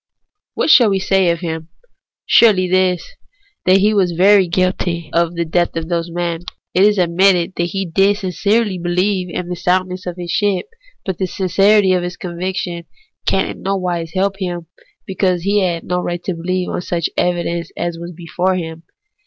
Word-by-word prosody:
What - - +2
shall 235 -4 +7
we 195 - +1
say 190 -1 +2
of 170 0 -1
him? 160 -1 -5 0.6
Surely 200 -6 +5
this, 185 -1 +1 0.6
that 185 +1 +6
he 210 +2 +3
was 185 -4 +2
verily 190 +2 +5
guilty 170 -2 -1
of 170 0 +1
the 170 0 -1
death 175 +2 0
of 165 0 -4
those 170 -1 -1
men. 170 -1 -3 0.3
It 185 - +2
is 210 0 +3
admitted 180 0 +3
that 170 - +1
he 195 +3 -3
did 195 +4 +2
sincerely 200 +1 0
beheve 180 +2 0
in 175 0 -4
the 180 - -3
soundness 185 +1 -1
of 180 0 -5
his 175 -1 -5
ship; 200 -3 +1 0.4
but 190 -2 -3
the 190 - 0
sincerity 195 +2 +3
of 180 - +1
his 175 +1 -5
conviction 180 -1 -4 0.4
can - - +2
in - - -8
no 195 +1 -1
wise 175 -3 -3
help 195 +1 0
him, 175 -3 -4 0.4
because 185 -2 0
he 200 +2 +2
had 175 -4 -1
no 180 0 -1
right 175 -1 -4
to 190 - -2
believe 180 +2 -2
on - - -3
such 170 -2 -1
evidence 170 -1 -1
as 170 -1 -3
was 170 +1 -7
before 175 +2 -2
him. 165 -2 -5
180 Hz, 185 wpm, -18 LUFS, 170-190 Hz, 0.6 s, shall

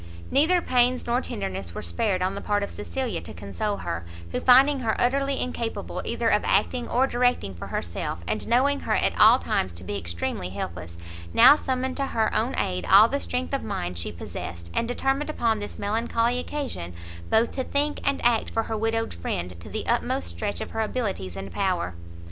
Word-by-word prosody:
Neither 330 +5 +4
pains 250 0 +2
nor 240 +2 +1
tenderness 95 - -5
were - - -5
spared 185 - 0
on 185 +1 0
the 200 - -5
part 205 -1 0
of 200 - -4
Cecilia 250 +3 -3
to - - -10
console 200 - -3
her; 85 0 -4 0.3
who - - -1
finding 270 +3 +6
her 230 -3 -1
utterly 275 +2 +1
incapable 235 -2 -3
either - - -1
of - - +3
acting 245 -2 +1
or 250 +3 +3
directing 245 - +1
for 85 - -8
herself, 85 -1 -3
and - - -2
knowing 275 +4 +3
her - - 0
at - - +2
all - - +8
times 95 - -1
to 85 +2 -9
be 100 +2 -3
extremely 85 +1 -3
helpless, 90 -2 -6 0.4
now - - +9
summoned 260 -3 -2
to 275 -1 0
her 220 -3 0
own 235 +4 +1
aid 90 0 -1
all 205 +3 +9
the 280 - 0
strength 255 0 -3
of 275 - 0
mind 90 +1 -3
she 85 - -4
possessed, 85 0 -7
and 230 - 0
determined 270 +4 0
upon 230 -7 +1
this 205 - -6
melancholy 230 +3 0
occasion, 250 - -5 0.3
both 230 +1 +3
to 260 - -2
think 290 +3 0
and 280 -2 0
act 235 -2 +3
for 225 - 0
her 220 - -3
widowed 225 +1 -1
friend 85 +1 -4
to 85 - -10
the - - -4
utmost 85 -1 0
stretch 85 - -4
of - - -5
her 225 - -1
abilities 200 - -2
and 95 0 -6
power. 185 - -1
220 Hz, 195 wpm, -25 LUFS, -, 0.4 s, now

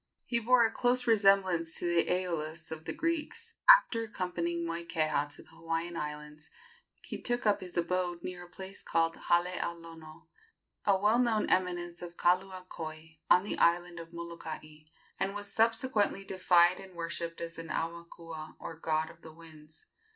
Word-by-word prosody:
He 235 - 0
bore 235 +1 +5
a 220 - +1
close 245 +1 +1
resemblance 195 -6 +3
to - - -3
the 170 -1 +2
Æolus 165 -3 -2
of 160 0 -7
the - - -3
Greeks. 330 -2 -3 0.2
After - - +8
accompanying 170 -4 -2
Moikeha 165 -3 -1
to - - -13
the - - -20
Hawaiian 165 +1 -3
Islands 150 0 -6 0.5
he - - -7
took 240 -1 -1
up 210 -1 +3
his 180 -1 -8
abode 175 0 -1
near 180 -1 -6
a - - -18
place 190 +2 -9
called 165 0 +1
Hale 175 0 +2 0.2
a 170 - -2
Lono, 165 -1 -13 0.6
a 200 -2 +4
well 210 +5 +3
known 230 -4 +2
eminence 175 -2 0
of 175 -1 -8
Kaluakoi, 175 -4 -2
on 180 - +6
the 205 - -4
island 175 0 +2
of 165 0 -10
Molokai, 160 -2 -8 0.3
and 195 +1 -1
was 205 -1 -6
subsequently 225 -3 +2
deified 180 -2 +4
and 190 -2 -12
worshipped 170 0 -4
as 165 0 -6
an 165 - -7
aumakua, 165 -1 -5
or 165 -1 -8
god 160 0 0
of 165 - -20
the 160 - -11
winds. 155 -1 -14
170 Hz, 165 wpm, -31 LUFS, 165-195 Hz, 0.6 s, After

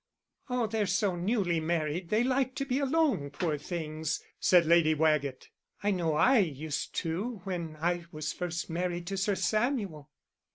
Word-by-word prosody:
"Oh, 250 -2 +1
they're 220 -2 0
so 195 0 +1
newly 180 -2 +1
married 165 +1 -1
they 215 +3 +3
like 260 0 +1
to 275 - -2
be 265 0 0
alone, 275 - +1
poor 150 +1 -2
things," 155 -1 -3 0.2
said 175 -2 +5
Lady 160 -1 +5
Waggett. 150 -4 +1 0.3
"I 205 - +2
know 170 -5 0
I 255 - +5
used 155 -5 -2
to 195 +7 -3
when 170 -5 -4
I 175 +1 0
was 155 0 -3
first 170 -2 -3
married 175 +1 -2
to 195 +3 -3
Sir 200 +1 +1
Samuel." 210 - -1
175 Hz, 160 wpm, -30 LUFS, 155-215 Hz, 0.3 s, said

